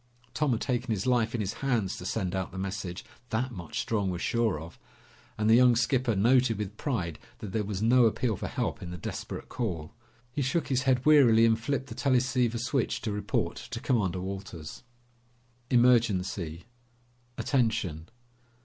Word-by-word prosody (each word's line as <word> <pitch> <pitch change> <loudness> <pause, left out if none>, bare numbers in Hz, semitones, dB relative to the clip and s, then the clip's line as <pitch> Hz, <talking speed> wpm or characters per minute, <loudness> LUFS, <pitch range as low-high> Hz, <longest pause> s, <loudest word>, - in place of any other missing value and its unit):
Tom 150 -2 +1
had 115 - 0
taken 125 -2 -1
his 105 -4 -1
life 120 -2 +2
in 115 - -1
his 100 +1 -2
hands 115 -9 0
to - - -6
send 95 -5 -2
out 95 -1 -2
the 95 - -8
message, 95 -2 -4 0.2
that 125 +4 -1
much 85 -8 -6
Strong 105 -4 0
was 90 -1 -3
sure 115 -4 0
of! 80 +2 -11 0.6
And 105 0 0
the 110 - +6
young 125 0 +6
skipper 120 0 +1
noted 120 +2 +3
with 105 0 -4
pride 90 - -3 0.2
that 105 -5 -7
there 110 +2 0
was 100 0 -3
no 120 +2 +5
appeal 115 0 +1
for - - -5
help 115 -2 -3
in 90 - -6
the 90 - -6
desperate - - -6
call. 90 -8 -4 0.4
He 145 - -2
shook 140 +5 0
his 130 -2 +2
head 125 -1 +2
wearily 125 -7 +6
and 110 -1 +3
flipped 135 +3 -2
the 125 - -8
teleceiver 125 -2 +1
switch 125 +2 -1
to 110 - -2
report 105 0 -1
to - - -6
Commander 95 -7 0
Walters. 95 -5 -7 0.9
"Emergency... 105 -9 +2 0.7
attention...." 95 - 0
110 Hz, 175 wpm, -29 LUFS, 95-125 Hz, 0.9 s, the